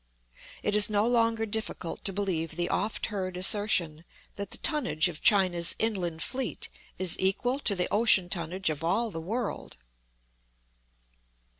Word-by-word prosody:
It 210 - +1
is 210 0 +6
no 210 0 +2
longer 230 -2 +2
difficult 220 -5 -5
to 195 - +2
believe 180 -5 -2
the 175 +1 -2
oft 215 +1 -1
heard 185 -2 -3
assertion, 180 -5 +2 0.3
that 200 -1 -5
the - - -4
tonnage 245 - +1
of 165 -4 -7
China's 180 -5 +3
inland 180 -7 -1
fleet 265 0 -3 0.3
is 185 -3 +2
equal 245 +8 0
to 210 -8 +2
the 180 -1 -1
ocean 205 -4 +4
tonnage 175 0 -1
of 150 +1 -6
all 215 +7 0
the 165 - -6
world. 220 - -4
195 Hz, 145 wpm, -28 LUFS, 175-220 Hz, 0.3 s, is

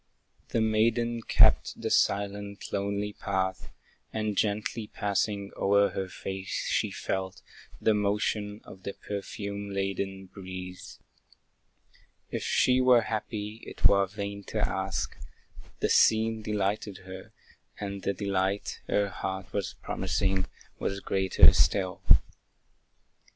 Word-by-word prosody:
The 115 - +1
maiden 115 +2 +2
kept - - +4
the - - -2
silent, 100 0 0
lonely 100 +1 -1
path, 95 -2 -2 0.4
And 110 -1 -1
gently 105 +2 -1
passing 100 -1 -1
o'er 100 +1 +4
her 95 -1 -3
face, 95 0 -4
she - - +2
felt 95 0 -4 0.4
The 110 - +3
motion 105 0 0
of 95 - -12
the 100 - -5
perfume 100 0 -5
laden 95 0 -2
breeze. 95 -1 -8 1.3
If - - -2
she 130 0 +3
were 125 -2 +6
happy, 110 0 -4
it - - -5
were 100 -1 +6
vain 100 0 -5
to - - 0
ask; - - -2 0.7
The - - +2
scene 110 0 +4
delighted 105 -1 -2
her, 95 0 -9 0.5
and 100 -1 -4
the 100 - 0
delight 100 0 -1
Her 100 0 +2
heart 95 -1 -5
was 100 -2 -2
promising, 95 -1 0 0.3
was 100 - -2
greater 95 -1 +5
still. 95 -3 +2
100 Hz, 115 wpm, -29 LUFS, 95-105 Hz, 1.3 s, were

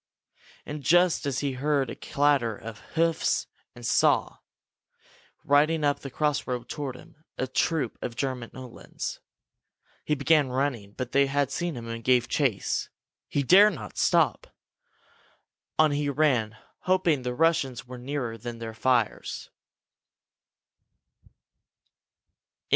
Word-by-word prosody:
And 150 0 -6
just 175 +3 +3
then 140 - -1
he 140 +2 -1
heard 135 -1 0
a - - -6
clatter 140 -6 +1
of 110 0 -9 0.2
hoofs 165 0 +1 0.3
and 120 -1 -9
saw, - - +2 1.1
riding 150 +2 +3
up 145 -1 +2
the 135 - -7
crossroad 130 -4 -1
toward 140 -2 -4
him, 155 +4 -16
a 130 - 0
troop 140 -1 -1
of 120 - -4
German 125 -2 -3
Uhlans. 130 -2 -7 0.8
He 150 - 0
began 145 0 +3
running. 125 -6 -2
But 125 +1 -5
they 140 0 +4
had 140 0 0
seen 175 -5 -2
him 115 -1 -7
and 115 0 -6
gave 125 -1 +3
chase. 130 -10 0 0.4
He 140 - 0
dared 195 +7 +6
not 105 -8 -9
stop. - - +2 1.3
On 155 -1 +5
he 145 0 0
ran, 130 -7 +1 0.2
hoping 180 -6 +2
that 125 - -3
the 125 - -4
Russians 150 -6 +1
were 125 0 -9
nearer 125 -3 -4
than 120 +1 -6
their 115 -1 -6
fires. 120 -1 -1
135 Hz, 130 wpm, -27 LUFS, 120-150 Hz, 1.3 s, dared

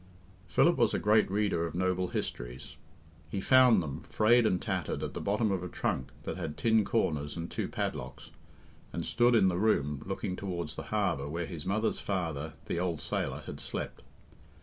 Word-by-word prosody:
Philip 170 - +4
was 115 -2 +3
a - - +2
great 105 +1 +3
reader 100 -4 +1
of 85 - -8
noble 90 0 +1
histories. 60 -3 -5 0.5
He 95 - -2
found 125 -3 +6
them, 75 0 -5
frayed 115 +2 +4
and 90 - +1
tattered, 95 -6 -2
at - - -4
the - - -4
bottom 105 +1 +1
of 95 -2 0
a 90 - -4
trunk 65 - -2
that - - -4
had 75 - -4
tin 110 -1 +3
corners 75 -10 0
and 85 0 -5
two - - -2
padlocks, - - -4 0.6
and - - -3
stood 120 0 +3
in 95 - +5
the 90 -1 +1
room 75 -10 +1
looking 95 0 -3
towards 85 -5 -4
the - - -5
harbour 90 -10 0
where 85 +3 -2
his 85 -2 -7
mother's 110 +3 +1
father, 80 -6 -3
the 85 - -2
old 85 -3 -1
sailor, - - -3
had - - -7
slept. - - -5
90 Hz, 185 wpm, -31 LUFS, 80-105 Hz, 0.6 s, found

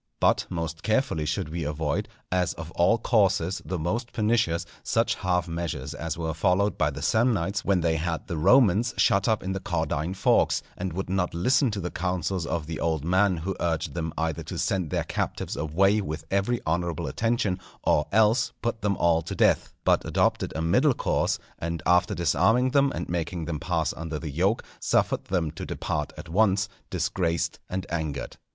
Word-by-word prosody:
But - - +3
most 85 -1 -4
carefully 110 - 0
should 75 0 -2
we 85 +1 -3
avoid, 75 0 -2 0.2
as 90 -1 +1
of 80 0 -8
all 90 +8 +3
courses 95 -6 +2
the 95 - -3
most 110 +10 -2
pernicious, 110 -6 +1 0.2
such - - +1
half 90 -1 0
measures 80 -5 -4
as 80 +1 -4
were 80 -1 -2
followed 90 +4 +2
by - - +1
the - - -6
Samnites 105 -5 +1
when 95 -3 +2
they 80 -1 +1
had 80 +1 -2
the 85 - -4
Romans 115 - +4
shut 100 0 +3
up 110 -3 +1
in 95 - -2
the 95 - -2
Caudine 80 -1 -2
Forks, 95 - +2
and 95 0 -3
would 95 +3 -3
not 90 -2 -1
listen 125 - +3
to 105 -2 -3
the 90 -1 -4
counsels 90 -1 -2
of 85 -2 -2
the 80 0 -5
old 80 -3 -1
man 95 +1 +3
who 90 +4 -3
urged 80 -3 -1
them 80 -2 -3
either 80 -2 -1
to - - -6
send 95 -5 0
their - - 0
captives - - -3
away 95 +7 +2
with 80 -4 -5
every 100 +5 +1
honourable 85 0 -1
attention, 110 -5 0 0.2
or 75 - +2
else 110 +4 +3
put 115 -1 -1
them 100 -1 0
all 85 -1 +3
to 85 - -6
death; - - +3
but - - +3
adopted - - +1
a 80 - -1
middle 125 - +3
course, - - 0 0.2
and 85 -1 -3
after 90 0 +3
disarming 110 - +3
them 140 0 +3
and 85 - -4
making 85 -1 -3
them 80 -2 -3
pass 85 -2 -1
under 80 -1 -5
the 75 -1 -5
yoke, 95 - +1 0.2
suffered - - +1
them 85 -5 -1
to 80 - -8
depart 75 -1 -3
at 80 +3 -8
once 100 +2 +2 0.2
disgraced 85 -2 -1
and 95 +1 -3
angered. 80 -4 -3
90 Hz, 185 wpm, -26 LUFS, 80-100 Hz, 0.2 s, Romans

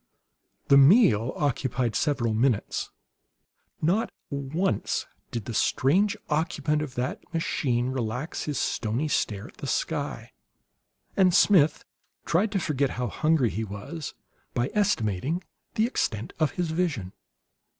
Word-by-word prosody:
The 140 - +8
meal 135 - +6
occupied 130 -4 0
several 130 -6 +1
minutes. 115 -1 0 0.9
Not 190 +8 +2 0.2
once 140 - -1 0.2
did 115 -3 -4
the 120 - -5
strange 185 - +2
occupant 150 -1 0
of 140 -4 -5
that 125 +2 -2
machine 130 -6 0
relax 125 +3 -3
his 150 -3 -2
stony 120 +7 -1
stare 105 -8 -1
at - - -20
the - - -6
sky, - - -2 0.8
and 185 -3 +4
Smith 160 -8 +4 0.4
tried 200 +6 +2
to 195 - +2
forget 140 -5 0
how 125 -2 -1
hungry 155 -2 +2
he 110 - -2
was 110 - -6 0.4
by 120 +3 0
estimating 165 - 0 0.3
the 220 - +3
extent 115 - -2
of 155 -6 +2
his 175 -3 -2
vision. 150 - -1
140 Hz, 125 wpm, -27 LUFS, 120-165 Hz, 0.9 s, The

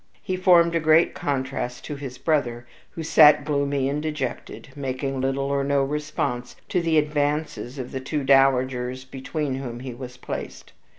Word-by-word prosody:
He 185 - -2
formed 175 -2 +5
a 165 - +2
great 160 +1 +4
contrast 130 -3 -3
to 150 - -5
his 135 -3 -7
brother, 120 -7 0 0.2
who 165 - -7
sat 150 -2 +6
gloomy 140 -2 0
and 145 +2 -1
dejected, 150 -4 -5
making 135 -1 -3
little 135 +1 0
or 140 0 0
no 140 0 +2
response 140 -4 -3
to 180 - +1
the 165 -2 +2
advances 150 -3 -1
of 125 -2 -6
the 130 - -3
two 140 +2 -3
dowagers 130 -1 +2
between 135 +2 -4
whom 120 -3 -6
he 130 -1 -6
was 125 0 -9
placed. - - -7
140 Hz, 165 wpm, -24 LUFS, 130-150 Hz, 0.2 s, sat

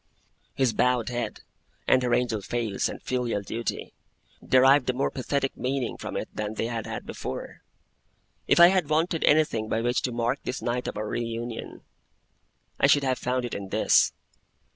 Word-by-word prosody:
His 130 -4 +2
bowed 125 0 +1
head, 120 -1 -4 0.5
and 130 - +5
her 125 -1 -1
angel 115 -4 +1
face 110 -1 -2
and - - -7
filial 120 -5 -1
duty, 115 +3 -4 0.5
derived 130 +1 +5
a - - +2
more 130 +2 -1
pathetic 135 +1 -2
meaning 130 -1 -2
from - - -5
it - - -3
than 105 0 -4
they 110 - -1
had 115 -2 -4
had - - -5
before. - - -6 0.9
If - - +4
I 170 0 +10
had 185 -5 +1
wanted 160 +1 +1
anything 145 -8 +2
by 110 - 0
which 120 +1 +1
to 125 - -2
mark 120 +3 -1
this 130 - -4
night 125 +1 -2
of - - -4
our 105 0 -3
re 120 - -2
union, 115 0 -6 1.0
I - - +5
should 145 0 +4
have 130 -1 0
found 125 0 -1
it 120 - -6
in 100 -1 -5
this. - - +4
125 Hz, 180 wpm, -26 LUFS, 115-135 Hz, 1.0 s, I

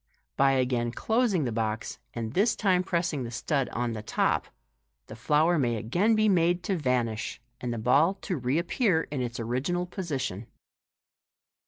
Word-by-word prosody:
By 135 0 +4
again 125 -2 +1
closing 220 - +1
the 120 - -1
box, 110 0 -3 0.2
and 115 -1 -4
this 210 +7 +3
time 185 -4 +2
pressing 170 -6 -1
the 120 - -5
stud 135 +3 -1
on 120 0 -2
the 110 - -5
top, 110 - 0 0.6
the - - -10
flower 155 +3 +2
may 120 -4 +1
again 175 - +1
be 215 0 +3
made 175 -2 +2
to 190 +1 0
vanish, 125 -7 -1 0.2
and 125 -1 -3
the 120 - -3
ball 140 - +3
to 185 - -2
reappear 165 - +1
in 140 -3 -2
its 120 -1 -4
original 130 +10 -1
position. 140 - -4
140 Hz, 160 wpm, -28 LUFS, 120-175 Hz, 0.6 s, By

